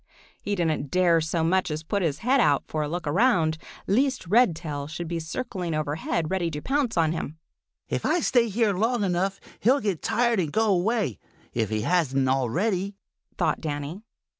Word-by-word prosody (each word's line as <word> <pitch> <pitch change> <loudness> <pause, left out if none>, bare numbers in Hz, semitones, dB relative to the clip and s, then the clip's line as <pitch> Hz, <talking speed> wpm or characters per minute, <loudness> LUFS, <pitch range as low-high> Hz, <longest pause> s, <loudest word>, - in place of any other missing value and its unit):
He 205 - -2
didn't 160 -5 -1
dare 175 -1 +3
so 160 +1 -1
much 185 +3 +2
as 155 +1 -3
put 200 +5 -1
his 155 -5 0
head 270 +2 +4
out 145 - +3
for 155 - -2
a 150 - -1
look 175 +1 -4
around, 160 - +2 0.3
lest 255 +3 +1
Redtail 165 - +1
should 170 +2 -5
be 170 0 -2
circling 180 0 -4
overhead 155 +2 -2
ready 180 -3 0
to 150 -2 -4
pounce 265 - -1
on 160 -2 +3
him. 160 -2 -4 0.5
"If - - -2
I 335 +2 +2
stay 240 -5 +3
here 215 0 +2
long 225 +4 +1
enough, 190 +1 0 0.2
he'll 260 +7 +4
get 200 - -2
tired 235 -1 +2
and 160 -5 -1
go 225 +5 +2
away, 190 - 0 0.3
if 110 -3 0
he 110 -1 -1
hasn't 135 -3 +1
already," 180 - 0 0.4
thought 160 -4 0
Danny. 150 +4 -4
175 Hz, 180 wpm, -26 LUFS, 155-215 Hz, 0.5 s, head